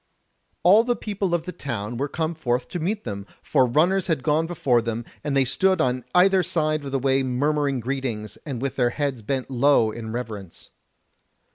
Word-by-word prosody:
All 205 +6 +7
the 240 0 0
people 200 -5 -2
of 165 -1 -3
the 180 - -4
town 120 - -4
were 140 +4 -1
come 160 +2 -2
forth 125 -5 -1
to 180 - -4
meet 205 +6 -2
them, 100 0 -6 0.2
for 130 -4 +3
runners 175 +9 +2
had 160 -7 0
gone 160 +1 +2
before 135 -8 +2
them, 115 0 -3 0.2
and 145 -2 0
they 135 - +4
stood 190 +9 +2
on 125 0 +1
either 190 +1 +5
side 155 -3 0
of 140 - -6
the 135 - +1
way 135 0 +2
murmuring 140 +1 0
greetings, 120 -4 -3
and 135 -5 -5
with 135 - -3
their 125 -2 +3
heads 135 -2 -2
bent 130 +4 -3
low 130 -3 +4
in 110 0 -6
reverence. 110 -7 -7
135 Hz, 190 wpm, -24 LUFS, 120-160 Hz, 0.2 s, All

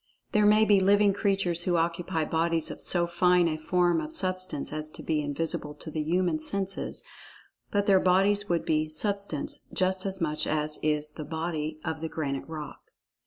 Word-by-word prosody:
There 210 -1 +4
may 215 +1 +5
be 205 -2 +5
living 200 +1 +4
creatures 195 -4 0
who 180 - +1
occupy 165 -1 -1
bodies 165 0 0
of - - -9
so 175 -1 +3
fine 175 0 +3
a 155 - -1
form 175 +1 +1
of 155 0 -6
Substance 185 -5 -1
as 155 0 -3
to - - -10
be 155 -1 0
invisible 150 0 -3
to 155 +1 -9
the 155 - -2
human 170 +1 0
senses—but 195 +2 -4
their 195 -2 +5
bodies 195 +3 +3
would 170 -1 0
be 155 0 +1
"Substance" 200 -1 -1
just 185 +1 0
as 190 0 -4
much 155 -3 -1
as 150 0 -1
is 150 0 0
the 155 - -8
"body" 160 -1 -4
of 160 -1 -3
the 160 - -3
granite 140 -4 -3
rock. 155 -2 -8
170 Hz, 175 wpm, -28 LUFS, 155-190 Hz, -, may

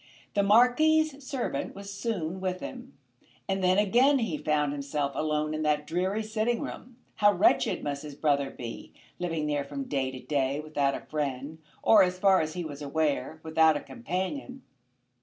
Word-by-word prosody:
The 200 - +3
Marquis's 275 +8 +4
servant 260 -2 -3
was 200 0 -8
soon 190 -5 -3
with 185 -1 -2
him, 255 +4 -9 0.5
and 195 -1 -1
then 185 +1 +4
again 245 +8 +4
he 225 -10 -1
found 150 -1 0
himself 140 0 -2
alone 155 0 -1
in 155 - -2
that 150 -1 +1
dreary 185 +7 -1
sitting 220 +2 -1
room. 245 -1 -8 0.2
How 205 0 +5
wretched 185 - +2
must 140 -1 -3
his 150 -2 -8
brother 140 -2 +1
be, 120 -3 -8 0.3
living 165 -3 -2
there 145 -1 0
from 140 0 -5
day 135 -1 -1
to 130 -1 -8
day 140 0 -1
without 145 -3 0
a - - -6
friend, 145 +1 -3 0.2
or, 215 -2 +7
as 180 -1 +2
far 190 0 +4
as 155 0 -3
he 175 -2 -3
was 145 -2 -7
aware, 150 +1 -1
without 160 -1 +4
a - - -4
companion! 250 - -5
160 Hz, 175 wpm, -28 LUFS, 150-210 Hz, 0.5 s, or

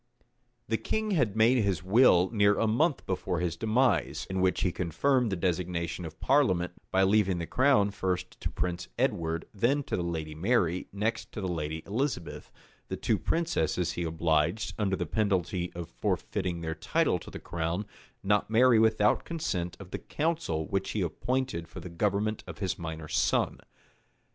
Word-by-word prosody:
The - - +1
king 220 -1 -1
had 120 - +1
made 115 +3 +5
his 95 -5 0
will 95 -2 +5
near 105 -2 +3
a - - +2
month 140 +8 +1
before 90 -2 -2
his 85 -1 -1
demise; 115 +7 +1
in 95 0 0
which 95 0 +2
he 90 - +1
confirmed 120 - +1
the - - 0
destination 85 -1 -2
of 80 +1 -9
parliament, 95 -11 +2 0.2
by 95 0 +3
leaving 95 -2 +3
the 85 - -3
crown 125 -3 +3
first 95 -2 -3
to - - -1
Prince 90 0 -3
Edward, 80 0 0
then 125 +8 +1
to - - -3
the - - -1
lady 80 -3 -3
Mary, 90 0 +1
next 110 +3 -2
to - - -5
the 95 - -2
lady 80 -2 -3
Elizabeth: 115 - -3 0.4
the - - -4
two - - 0
princesses 90 - 0
he - - -4
obliged, 80 +4 0
under 95 -2 +1
the 90 - -2
penalty 90 -2 0
of 85 -1 -6
forfeiting 85 0 -2
their 80 -1 -2
title 80 0 +1
to - - -11
the - - -7
crown, 85 +4 -3 0.4
not 105 +1 +2
to - - -15
marry 120 0 +6
without 110 -1 +3
consent 90 - -3
of 95 -2 -11
the - - -4
council 155 - -1
which 95 +3 -2
he 105 - -1
appointed 105 +1 -2
for 85 - -9
the 90 +1 -8
government 105 +4 -1
of - - -8
his 95 -3 -2
minor 80 -2 -5
son. 80 +2 +1
95 Hz, 175 wpm, -29 LUFS, 85-110 Hz, 0.4 s, marry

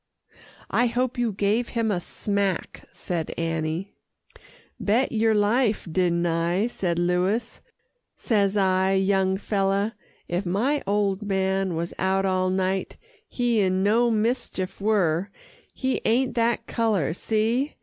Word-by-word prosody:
"I 245 - +3
hope 250 +1 -1
you 235 -2 +1
gave 210 +4 0
him 225 -2 +1
a 180 -3 -1
smack," 200 0 -2
said 170 -3 -4
Annie. 165 +3 -2 0.9
"Bet 230 +6 +1
yer 225 -1 +2
life, 210 0 +1
didn't 175 0 +1
I," 170 +4 +1
said 180 -8 -2
Louis. 180 +6 0 0.6
"Says 205 -3 +1
I, 190 0 +2
'Young 190 0 +2
feller, 200 +1 0 0.3
if 175 +3 -1
my 230 +11 0
old 200 -1 +1
man 190 -2 0
was 170 +1 -3
out 190 +1 +1
all 185 -1 +1
night, 190 0 -1 0.3
he 240 -3 0
in 185 0 +1
no 230 +4 +3
mischief 220 -4 -1
were 195 -4 +1 0.4
he 260 -1 -2
ain't 250 +3 +2
that 235 0 +1
colour 210 -10 0
see! 225 - 0
200 Hz, 130 wpm, -25 LUFS, 185-225 Hz, 0.9 s, I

